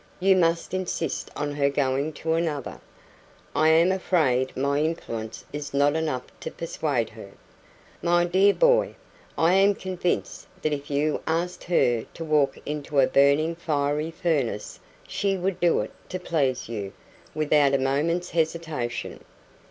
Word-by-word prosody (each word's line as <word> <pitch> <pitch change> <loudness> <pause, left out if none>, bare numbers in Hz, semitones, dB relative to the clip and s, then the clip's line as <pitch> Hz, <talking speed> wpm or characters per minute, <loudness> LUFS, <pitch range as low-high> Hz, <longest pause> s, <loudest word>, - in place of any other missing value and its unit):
"You 190 +1 +4
must 170 -1 +1
insist 180 -4 -2
on 145 0 -2
her 140 -1 +2
going 140 +2 0
to 160 +2 -2
another." 160 -5 -2 0.7
"I 155 - +4
am 165 +3 +5
afraid 155 -9 +1
my 140 +2 +1
influence 115 -9 -3
is 145 -1 -5
not 145 +1 +3
enough 155 -6 -1 0.2
to - - -5
persuade 145 -8 -2
her." 110 -3 -11 0.7
"My 175 0 +3
dear 190 +3 +4
boy, - - +3 0.4
I 165 +2 +4
am 195 +1 +4
convinced 185 -2 -3 0.2
that 155 - +1
if 145 0 -5
you 150 +1 0
asked 170 +2 -2
her 120 -10 +2
to 165 - -5
walk 150 -3 +2
into 150 -1 -2
a 135 - +6
burning 140 +5 +3
fiery 150 -1 -1
furnace, 140 -11 -2 0.3
she 195 -1 -1
would 185 0 -2
do 175 -1 +3
it - - -6 0.2
to 185 - -4
please 140 -8 -1
you, 105 -4 -5 0.4
without 150 -2 +3
a - - +4
moment's 150 +7 0
hesitation." 160 -7 -2
155 Hz, 145 wpm, -25 LUFS, 140-170 Hz, 0.7 s, a